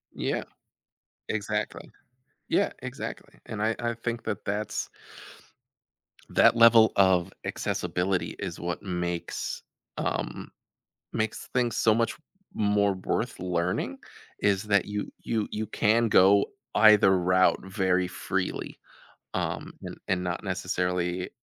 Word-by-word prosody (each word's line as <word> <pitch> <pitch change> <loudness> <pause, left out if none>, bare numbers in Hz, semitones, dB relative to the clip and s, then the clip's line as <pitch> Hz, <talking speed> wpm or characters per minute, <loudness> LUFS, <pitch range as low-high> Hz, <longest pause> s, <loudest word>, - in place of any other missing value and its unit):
Yeah. - - -1 0.9
Exactly. 105 -2 -3 0.6
Yeah, - - +2
exactly, - - -7
and 105 -1 -4
I 110 +1 +1
I 120 -1 -1
think 115 0 -4
that 110 -1 -3
that's 105 +1 -3 1.4
that - - +5
level 115 -1 +7
of 95 -1 +4
accessibility 90 +1 -1
is - - -5
what 85 0 -3
makes 90 -3 -3 0.3
um, - - -3 0.6
makes 110 +1 -2
things 120 -2 +1
so 110 - +4
much 115 0 0 0.4
more 100 -1 +2
worth 105 +5 -2
learning, 90 0 -1 0.4
is 100 -1 +2
that 100 -3 +2
you 105 0 -4
you 110 -2 -1
you 110 +1 -3
can 115 +2 +2
go 100 -1 +6 0.3
either 105 -3 +7
route 90 +1 +3
very 95 -2 +1
freely, 90 +1 -3 0.5
um, - - -3
and - - -6
and 90 -1 +1
not 90 0 -3
necessarily 90 -1 -1
100 Hz, 115 wpm, -27 LUFS, 90-110 Hz, 1.4 s, level